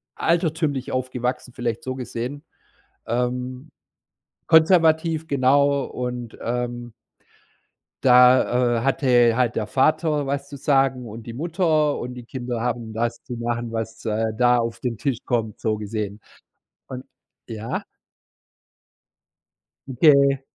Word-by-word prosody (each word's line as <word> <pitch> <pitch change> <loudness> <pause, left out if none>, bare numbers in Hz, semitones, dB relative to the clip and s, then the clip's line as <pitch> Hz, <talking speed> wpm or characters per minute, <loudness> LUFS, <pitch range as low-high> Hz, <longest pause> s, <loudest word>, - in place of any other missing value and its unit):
altertümlich 160 -5 0
aufgewachsen, 125 -1 -3
vielleicht 120 -2 -3
so 130 0 -4
gesehen, 130 +3 -5 0.6
ähm 125 +4 -3 0.8
Konservativ, 160 -1 +4
genau 140 +1 +3
und, 125 -2 -6
ähm 120 0 -4 1.1
da, 125 -1 +5
äh, - - -1
hatte 125 -4 +3
halt 125 -2 +1
der 110 - -1
Vater 150 +5 +1
was 140 0 -3
zu 145 - -8
sagen 135 -3 +1
und 110 +1 -9
die 115 - -7
Mutter 155 0 +1
und 125 +1 -5
die 125 -1 -10
Kinder 120 -2 -5
haben 120 -2 -3
das 115 +1 -2
zu - - -7
machen, 120 0 -3
was, 115 0 -5
äh, 110 0 -1
da 125 0 +4
auf 115 0 -3
den 120 -2 -3
Tisch 135 0 -1
kommt, 115 -4 -2
so 110 -1 -1
gesehen 105 -1 -5 0.7
und 130 0 -8 0.4
ja? 110 -1 -5 2.1
Okay. 140 0 +4
125 Hz, 120 wpm, -23 LUFS, 115-140 Hz, 2.1 s, da